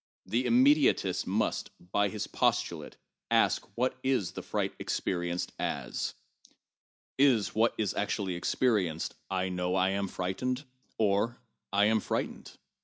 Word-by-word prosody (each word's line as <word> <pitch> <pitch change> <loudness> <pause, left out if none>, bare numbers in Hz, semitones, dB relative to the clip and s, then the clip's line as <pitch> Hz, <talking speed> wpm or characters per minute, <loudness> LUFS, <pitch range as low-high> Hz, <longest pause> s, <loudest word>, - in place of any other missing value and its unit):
The 115 +6 0
immediatist 130 +4 +4
must, - - 0
by 100 +3 0
his 105 +1 -3
postulate, - - -1 0.3
ask - - +3
what 130 +2 0
is 130 -9 +1
the - - -6
fright - - -2
experienced 85 -1 -2
as. - - -2 1.0
Is 125 -8 +4
what 115 +2 +2
is 105 -3 0
actually 100 -2 -1
experienced, 90 -3 0 0.2
I 95 -1 0
know 90 0 -1
I 95 0 +3
am 100 +1 -1
frightened, 125 +10 -2 0.3
or 110 +3 +1 0.3
I 100 +1 +4
am 110 +1 +4
f 105 - -6
rightened - - -3
100 Hz, 130 wpm, -30 LUFS, 95-120 Hz, 1.0 s, immediatist